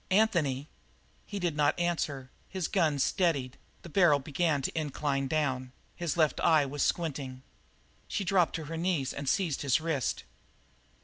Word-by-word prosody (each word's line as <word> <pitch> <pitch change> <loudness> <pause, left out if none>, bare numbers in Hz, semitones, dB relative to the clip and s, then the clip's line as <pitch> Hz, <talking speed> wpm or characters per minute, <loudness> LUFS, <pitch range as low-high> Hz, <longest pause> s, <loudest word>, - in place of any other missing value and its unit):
"Anthony!" 170 -10 +2 0.6
He 205 - -5
did 175 -5 -1
not 150 +2 +2
answer; 150 -6 -1 0.2
his 185 -4 -2
gun 160 -7 +2
steadied; 140 -3 +1 0.3
the - - -9
barrel 170 -4 +5
began 145 +1 0
to - - -2
incline 145 -3 -1
down; 130 -4 -1 0.2
his 170 -2 -2
left 155 -4 +2
eye 155 -3 +4
was 140 +1 -4
squinting. 135 -6 -1 0.6
She 200 - -2
dropped 180 -2 +2
to 160 - -3
her 165 +2 -5
knees 165 -6 0
and 140 -1 -3
seized 165 -1 0
his 140 -1 +2
wrist. 155 -6 -1
150 Hz, 150 wpm, -30 LUFS, 140-175 Hz, 0.6 s, barrel